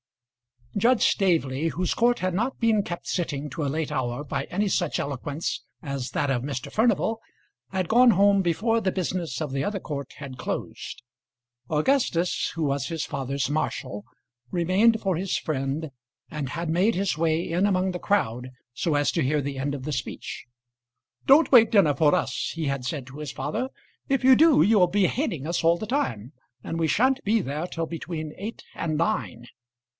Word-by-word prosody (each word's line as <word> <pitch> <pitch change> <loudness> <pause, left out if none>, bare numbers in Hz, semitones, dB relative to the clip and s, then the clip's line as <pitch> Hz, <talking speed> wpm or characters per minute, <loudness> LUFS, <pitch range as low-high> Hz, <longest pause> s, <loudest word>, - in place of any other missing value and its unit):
Judge 235 +4 +3
Staveley, 160 -6 +2
whose 180 +2 -1
court 240 +1 +2
had 185 -1 -1
not 230 +8 -1
been 225 -3 +3
kept 175 -3 -6
sitting 150 -5 -2
to 160 +3 -3
a - - 0
late 155 +2 -2
hour 125 -1 -2
by 145 - -3
any 205 +3 -1
such 175 -4 0
eloquence 145 +3 -3 0.2
as 140 -4 -4
that 145 - 0
of 125 -3 0
Mr. 130 -2 -5
Furnival, 225 0 +1 0.5
had 185 -3 -2
gone 245 +1 +6
home 200 0 +4
before 215 +7 +1
the 190 -3 +1
business 175 -7 -3
of 150 -3 -3
the 135 0 -1
other 200 +5 -2
court 140 -2 -6
had 135 -3 -8
closed. - - -5 0.7
Augustus, 175 - +1
who 165 - -1
was 140 -2 0
his 160 -3 -3
father's 135 -2 -2
marshal, 130 -7 -3 0.4
remained 190 - +3
for 190 -4 0
his 185 +2 -1
friend, 145 +1 -3 0.4
and 145 -4 -4
had 170 +3 -4
made 185 +7 +2
his 190 -1 0
way 160 +1 0
in 180 +4 +2
among 185 -1 +1
the 180 - -5
crowd, 125 - 0 0.2
so 155 +4 0
as 145 0 +2
to 165 - 0
hear 145 +2 +1
the 140 -1 -4
end 140 +1 -1
of 135 - -7
the 150 - -3
speech. 130 -4 -5 0.8
"Don't 290 +5 +6
wait 230 -4 +8
dinner 190 -9 +4
for 145 +1 +3
us," - - -2
he 165 -1 -2
had 140 -3 -2
said 130 +1 -3
to 135 +3 -10
his 150 -4 -5
father. 220 - -3 0.4
"If 270 -1 +1
you 260 0 +8
do 315 - +6
you 210 +3 +4
will 180 - +5
be 195 +2 +2
hating 200 - -2
us 170 +1 -1
all 170 +1 +5
the 215 - -5
time; 130 - -2 0.3
and 165 - -4
we 165 - +2
sha'n't 260 - +2
be 220 +2 +2
there 150 +2 -3
till 165 -2 -3
between 160 -2 -5
eight 215 +4 -6
and 155 -2 -2
nine." 165 - -1
165 Hz, 190 wpm, -25 LUFS, 140-200 Hz, 0.8 s, wait